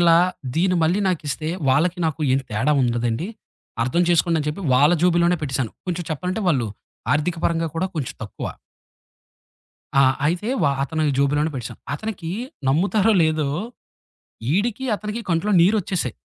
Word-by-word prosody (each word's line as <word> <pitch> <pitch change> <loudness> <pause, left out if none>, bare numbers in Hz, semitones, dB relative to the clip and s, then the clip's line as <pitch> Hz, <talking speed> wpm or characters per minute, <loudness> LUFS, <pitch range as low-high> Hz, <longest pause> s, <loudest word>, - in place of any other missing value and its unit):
మీరిలా 165 0 +6 0.4
దీన్ని 180 +2 +2
మళ్ళీ 175 +6 +2
నాకిస్తే 155 -3 -2 0.2
వాళ్ళకి 165 +7 +2
నాకు 160 0 -1
ఏం 135 - +3
తేడా 125 +8 +1
ఉండదండి 120 +4 0 0.6
అర్థం 130 +9 +1
చేసుకోండని 165 -3 +2
చెప్పి 175 +6 -4
వాళ్ళ 145 +6 +5
జేబులోనే 175 0 +3
పెట్టేేశాను. 130 -6 -2
కొంచెం 175 -1 -2
చెప్పాలంటే 180 +7 -2
వాళ్ళు 130 -8 +2 0.5
ఆర్థికపరంగా 165 +1 0
కూడా 185 +3 0
కొంచెం 145 -5 -3
తక్కువ. 105 - -6 1.5
ఆ! - - +7 0.2
అయితే 175 +8 -1
వా 140 - +4
అతను 155 +3 -2 0.2
జోబిలోనే 145 +3 +2
పెట్టసాను. 120 -3 -6
అతనికి 180 -3 -5 0.4
నమ్ముతారో 200 +9 +3
లేదో, 155 -2 +1 1.1
ఈడికి, 230 +6 0
అతనికి 210 +3 -5
కంట్లో 170 +5 +1
నీరొచ్చేసాయి. 185 - +1
165 Hz, 130 wpm, -22 LUFS, 145-180 Hz, 1.5 s, ఆ